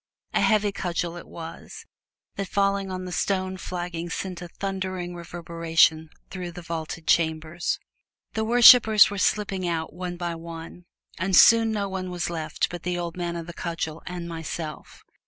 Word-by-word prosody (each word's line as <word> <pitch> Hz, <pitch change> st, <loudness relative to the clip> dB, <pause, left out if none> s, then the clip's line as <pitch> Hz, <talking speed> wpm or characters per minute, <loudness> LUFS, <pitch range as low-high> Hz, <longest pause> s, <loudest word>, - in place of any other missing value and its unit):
A -, -, +2 dB
heavy 210 Hz, -2 st, +3 dB
cudgel 175 Hz, -3 st, -3 dB
it 175 Hz, -, -9 dB
was 165 Hz, 0 st, -9 dB, 0.5 s
that 195 Hz, -1 st, -3 dB
falling 195 Hz, 0 st, +1 dB
on 185 Hz, 0 st, -4 dB
the 180 Hz, -, -6 dB
stone 185 Hz, 0 st, -1 dB
flagging 175 Hz, -2 st, -5 dB
sent 180 Hz, +1 st, -4 dB
a 175 Hz, -, -6 dB
thundering 185 Hz, -1 st, -4 dB
reverberation 165 Hz, -2 st, +1 dB, 0.2 s
through 180 Hz, -2 st, -5 dB
the 175 Hz, 0 st, -9 dB
vaulted 165 Hz, -1 st, -5 dB
chambers. 160 Hz, +1 st, +1 dB, 0.6 s
The 220 Hz, -, -1 dB
worshipers 220 Hz, -2 st, +8 dB
were 205 Hz, -, -4 dB
slipping 195 Hz, -3 st, 0 dB
out, 165 Hz, -3 st, -2 dB
one 175 Hz, 0 st, -5 dB
by 175 Hz, -1 st, -3 dB
one, 165 Hz, +1 st, -9 dB, 0.3 s
and 185 Hz, +1 st, +1 dB
soon 225 Hz, +3 st, +7 dB
no 205 Hz, -2 st, -1 dB
one 190 Hz, -1 st, -4 dB
was 175 Hz, -1 st, -3 dB
left 160 Hz, -2 st, -2 dB
but 175 Hz, -1 st, -6 dB
the 180 Hz, 0 st, -2 dB
old 170 Hz, -1 st, -4 dB
man 175 Hz, -1 st, -3 dB
of 170 Hz, -1 st, -5 dB
the 175 Hz, -, -8 dB
cudgel 165 Hz, -2 st, -4 dB
and 175 Hz, -1 st, -5 dB
myself. 165 Hz, -1 st, -6 dB
175 Hz, 165 wpm, -25 LUFS, 165-190 Hz, 0.6 s, worshipers